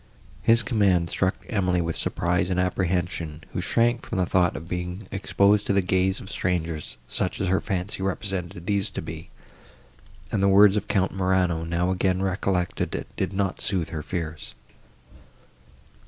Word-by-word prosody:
His 115 0 +4
command 95 -6 +2
struck 95 0 +1
Emily 90 -5 +1
with 85 -1 -1
surprise 90 +1 0
and 90 -1 0
apprehension, 90 -4 -1
who - - -1
shrank 120 +1 +2
from 110 - -4
the 90 - +2
thought 90 0 +2
of 80 +3 -7
being 90 +3 -4
exposed 100 +1 +2
to - - +2
the 100 - +4
gaze 95 +1 +1
of - - -10
strangers, 85 -8 -2
such 90 - -1
as 95 - 0
her 95 - +2
fancy 95 +1 -3
represented 95 -3 -3
these 100 0 +1
to - - -5
be, - - -8 1.0
and 100 - 0
the 100 - +4
words 100 +1 +7
of 105 - -1
Count 95 -1 +1
Morano, 90 -3 +1
now 85 +2 0
again 95 0 +1
recollected, 95 -2 -1
did - - -1
not 95 -1 -1
sooth 95 -5 0
her 80 - -4
fears. 80 -4 -5
95 Hz, 160 wpm, -25 LUFS, 90-100 Hz, 1.0 s, words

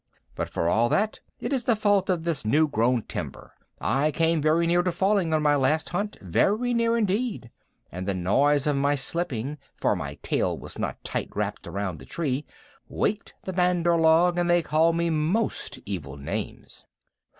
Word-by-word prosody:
"But - - -4
for 85 - -1
all 115 +7 +3
that, 215 - 0 0.2
it - - -3
is 250 -4 -1
the 235 - +3
fault 205 -3 +2
of 175 -3 0
this 165 -4 -1
new 150 +9 +3
grown 120 -3 +1
timber. - - -7 0.3
I 135 +6 +1
came 165 +1 +1
very 155 +3 +3
near 175 +1 +3
to 180 0 0
falling 190 -1 +1
on 155 -1 +1
my 145 -1 +4
last 145 +3 +1
hunt 205 +4 -3
very 210 - +1
near 230 0 +2
indeed 210 - -1 0.4
and 90 +2 -6
the 100 - 0
noise 135 +11 +2
of 150 -1 +2
my 140 +1 +2
slipping, 145 -2 -2 0.2
for - - +1
my - - -5
tail - - 0
was - - -8
not - - -4
tight - - -3
wrapped - - -3
around 95 -5 -4
the - - -12
tree, 145 -3 -2 0.4
waked 210 +1 -2
the 190 - -5
Bandar 180 -1 +2
log, 165 +2 +4
and 175 0 +1
they 175 -1 +4
called 160 +2 +2
me 170 0 +1
most 165 +9 -1
evil 75 -9 -5
names." 70 - -6
160 Hz, 185 wpm, -26 LUFS, 135-180 Hz, 0.4 s, my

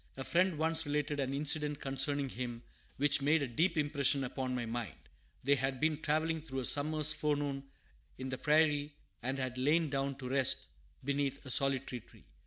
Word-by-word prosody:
A 135 - -4
friend 180 +2 +2
once 160 0 0
related 145 0 -1
an 135 -1 -1
incident 150 +1 0
concerning 135 +1 0
him 120 -2 -5 0.3
which 145 0 +3
made 150 +2 +3
a - - -1
deep 165 +9 +1
impression 145 -2 +2
upon 130 0 -3
my 120 -1 -2
mind. 115 -7 -4 0.5
They 140 +2 +4
had 135 -1 -1
been 155 +1 +1
travelling 160 +1 0
through 135 -4 -5
a - - -3
summer's 155 +2 +4
forenoon 145 -2 -1 0.5
in 130 0 -5
the 130 - -4
prairie, 150 -1 +2 0.3
and 130 +3 -1
had 130 -1 -3
lain 150 +3 +2
down 135 0 -1
to 130 -1 -7
rest 135 -1 +2 0.3
beneath 140 0 -1
a 130 - -3
solitary 135 -1 +2
tree. - - -20
140 Hz, 180 wpm, -33 LUFS, 130-150 Hz, 0.5 s, They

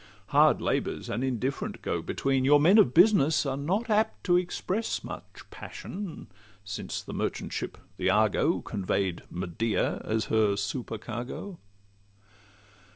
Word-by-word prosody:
Hard - - +4
labour's - - -1
an 120 - -2
indifferent 130 +1 -2
go - - -1
between; 135 -1 0
Your 145 +2 +6
men 180 +9 +6
of 125 - +5
business 165 -4 +5
are 135 -1 -1
not 185 +12 -1
apt 220 0 +1
to 175 - +3
express 185 +4 -1
Much - - -9
passion, 190 -3 -7 0.4
since 100 -1 -5
the - - -8
merchant - - -3
ship, - - -4 0.2
the 95 - +1
Argo, 110 - +2
Convey'd 95 -3 -2
Medea 95 +5 -1
as 110 0 -1
her 105 -2 +3
supercargo. 120 - -5
135 Hz, 130 wpm, -28 LUFS, 110-180 Hz, 0.4 s, Your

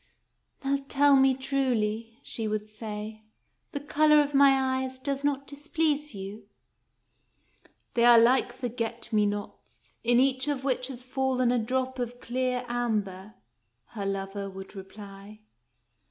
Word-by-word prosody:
" - - -35
Now 275 0 0
tell 285 0 +5
me 265 -1 +5
truly," 235 -5 -1
she 225 -2 -3
would 215 0 -2
say, 215 0 -7 0.3
" - - -47
the 285 - -3
color 300 +1 +4
of 290 0 +1
my 270 -1 +4
eyes 260 0 -5
does 275 +1 -3
not 280 -1 0
displease 295 -1 -1
you? 200 +2 -8 0.4
" - - -45
" - - -33
They 235 - +2
are 240 -1 +8
like 245 +2 +4
forget 240 -2 -5
me 210 -1 +4
nots, 205 0 -7
in 240 +1 +4
each 260 +1 +2
of 285 -3 -1
which 255 -2 0
has 255 -2 -8
fallen 255 -1 +1
a 245 - +2
drop 260 +3 -2
of 245 0 -4
clear 250 0 -2
amber," 215 -5 -2 0.5
her 200 -3 -4
lover 195 0 -3
would 195 +1 -10
reply. 200 +1 -11
245 Hz, 155 wpm, -28 LUFS, 215-270 Hz, 0.5 s, are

